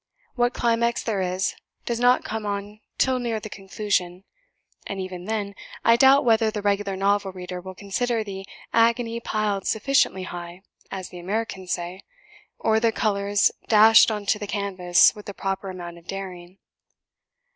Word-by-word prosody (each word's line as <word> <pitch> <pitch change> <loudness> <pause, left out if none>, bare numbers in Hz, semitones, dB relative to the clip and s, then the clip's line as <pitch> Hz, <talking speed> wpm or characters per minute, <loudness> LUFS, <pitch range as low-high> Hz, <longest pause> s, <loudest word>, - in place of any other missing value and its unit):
What 245 -1 +1
climax 235 0 +1
there 210 -4 -1
is 185 +1 -1 0.3
does 235 -1 -2
not 245 +1 +4
come 220 -1 -4
on 205 +1 -4 0.2
till 260 -1 +2
near 235 -3 -2
the 215 0 -9
conclusion; 195 -2 -2 0.6
and 195 - -5
even 185 -1 -6
then, 210 -2 -2 0.3
I 230 - +7
doubt 265 +3 +6
whether 225 -1 +4
the 210 -1 -5
regular 200 -1 0
novel 200 0 +1
reader 180 -1 -7
will 185 +1 -9
consider 225 +4 -1
the 195 -2 -7 0.3
'agony 230 0 +2
piled 210 -4 -1
sufficiently 220 -5 +2
high' 175 0 -8 0.3
(as 190 -2 -6
the 180 - -10
Americans 190 0 -3
say), 180 +2 -5 0.6
or 220 0 +2
the 230 0 +2
colours 205 -2 +1 0.2
dashed 220 +1 +7
on 210 -2 -3
to 210 +1 +1
the 205 - -5
canvas 190 -4 +3
with 210 - -12
the 200 - -6
proper 195 0 -3
amount 175 -2 -8
of 170 - -24
daring. 185 -2 -7
200 Hz, 160 wpm, -24 LUFS, 190-225 Hz, 0.6 s, I